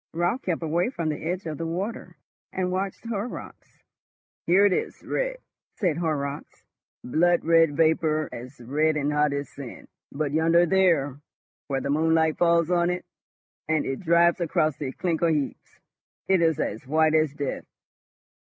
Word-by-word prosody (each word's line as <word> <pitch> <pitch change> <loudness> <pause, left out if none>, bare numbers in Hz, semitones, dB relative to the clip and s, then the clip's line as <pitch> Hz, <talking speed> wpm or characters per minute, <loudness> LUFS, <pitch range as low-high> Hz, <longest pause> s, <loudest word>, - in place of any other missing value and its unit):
Raut 175 +9 0
kept 170 -2 -2
away 170 +6 +1
from 170 -11 -3
the 150 - -4
edge 175 +3 -3
of 155 -3 -5
the 165 - -2
water, 190 +7 -5 0.3
and 180 -1 -2
watched 190 +4 -3
Horrocks. 230 +1 -7 0.6
"Here 190 +4 +5
it 200 - +4
is - - -3
red," - - -2 0.4
said 175 -8 0
Horrocks, 150 -4 -3 0.4
"blood 175 +7 +2
red 165 -3 +4
vapour 155 -1 +2
as 125 +3 -9
red 150 +6 0
and 145 0 0
hot 150 0 +2
as 140 -1 -3
sin; 135 -4 -10 0.2
but 145 0 -2
yonder 165 +3 +4
there, 165 -7 +2 0.5
where 135 -2 -1
the 140 - -2
moonlight 160 +1 +2
falls 170 -1 +3
on 175 -1 +2
it, 180 0 -3 0.6
and 160 -1 +1
it 135 - -3
drives 170 0 +3
across 155 -3 +1
the 140 -4 -4
clinker 170 +1 0
heaps, 150 -4 -3 0.5
it 190 -2 +3
is 160 -3 +2
as 115 - -3
white 155 +2 +3
as 155 -2 +2
death." 145 -2 -4
160 Hz, 160 wpm, -25 LUFS, 150-175 Hz, 0.6 s, Here